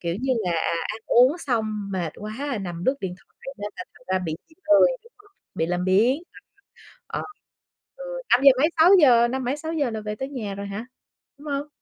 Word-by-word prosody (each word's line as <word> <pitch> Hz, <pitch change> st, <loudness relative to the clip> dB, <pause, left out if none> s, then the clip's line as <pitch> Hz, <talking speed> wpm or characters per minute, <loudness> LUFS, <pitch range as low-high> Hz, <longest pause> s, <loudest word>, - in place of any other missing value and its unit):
kiểu, 170 Hz, -1 st, -2 dB
như 260 Hz, 0 st, +1 dB
là, 180 Hz, -, 0 dB
à, 165 Hz, 0 st, 0 dB
ăn 220 Hz, -, -5 dB
uống 255 Hz, +8 st, +5 dB
xong 215 Hz, -, -2 dB
mệt 175 Hz, -4 st, -2 dB
quá, 240 Hz, +4 st, -4 dB
nằm 175 Hz, -2 st, -6 dB
lướt 265 Hz, -, +3 dB
điện 180 Hz, -2 st, -4 dB
thoại 270 Hz, +7 st, -12 dB
nên 205 Hz, 0 st, -5 dB
là 365 Hz, -, -6 dB
thành 250 Hz, -, -21 dB
ra 185 Hz, -, +1 dB
bị 165 Hz, -4 st, -4 dB
bị 320 Hz, -, -22 dB, 0.2 s
lười, 310 Hz, +11 st, +7 dB, 0.2 s
đúng 465 Hz, -, -20 dB
hông? 410 Hz, 0 st, -22 dB, 0.2 s
Bị 160 Hz, -, 0 dB
làm 180 Hz, +1 st, -1 dB
biếng, 225 Hz, -, +3 dB, 0.8 s
ờ, -, -, -4 dB
ờ. -, -, -5 dB, 0.7 s
Ừ, -, -, -9 dB, 0.3 s
năm 245 Hz, -, +5 dB
giờ 275 Hz, -, +10 dB
mấy 305 Hz, -, +4 dB
6:00, 290 Hz, -10 st, +7 dB
năm 260 Hz, +1 st, -3 dB
mấy 255 Hz, +4 st, -1 dB
6:00 310 Hz, -3 st, -2 dB
là 220 Hz, -1 st, -4 dB
về 210 Hz, 0 st, -5 dB
tới 265 Hz, -, -4 dB
nhà 225 Hz, -8 st, -5 dB
rồi 200 Hz, +1 st, -6 dB
hả? 200 Hz, +4 st, -6 dB, 0.5 s
Đúng 295 Hz, -, -14 dB
hông? 280 Hz, +1 st, -3 dB
235 Hz, 220 wpm, -24 LUFS, 195-280 Hz, 0.8 s, giờ